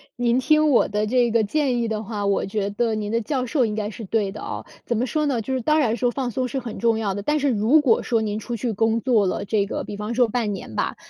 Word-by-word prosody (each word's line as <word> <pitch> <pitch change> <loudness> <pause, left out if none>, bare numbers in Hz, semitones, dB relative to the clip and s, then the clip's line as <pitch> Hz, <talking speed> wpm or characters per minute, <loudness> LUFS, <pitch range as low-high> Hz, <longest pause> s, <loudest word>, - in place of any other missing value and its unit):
您 245 +1 +2
听 305 +3 +3
我 265 - +4
的 210 +1 -1
这 240 0 +2
个 230 -1 +3
建 270 +4 0
议 230 - 0
的 220 0 -3
话， 205 -1 -4
我 200 0 +1
觉 200 0 -2
得 225 +2 0
您 210 -1 -3
的 230 - +1
教 260 +3 -2
授 255 -1 +2
应 210 - -2
该 210 -1 -2
是 225 +1 -8
对 200 -1 0
的 215 - -9
哦。 - - -5 0.2
怎 235 - -1
么 245 +4 0
说 305 +3 0
呢， 265 -5 0
就 265 +4 -3
是 260 - -1
当 305 +6 +2
然 235 -5 +1
说 245 +2 +1
放 255 -1 -2
松 255 +2 -2
是 265 +2 -3
很 235 -3 -7
重 230 -1 +1
要 200 -3 -1
的， 205 - -5
但 300 +4 +1
是 285 0 +1
如 245 +6 +4
果 245 -6 +3
说 230 -2 +1
您 210 -1 -2
出 235 +2 -4
去 235 +1 -2
工 225 +2 +1
作 235 -6 +3
了 185 - -1
这 205 -1 0
个 - - -4
比 205 - -7
方 210 +3 -4
说 245 0 +3
半 220 -2 -1
年 110 - -8
吧， - - -1
230 Hz, 315 characters per minute, -23 LUFS, 210-255 Hz, 0.2 s, 我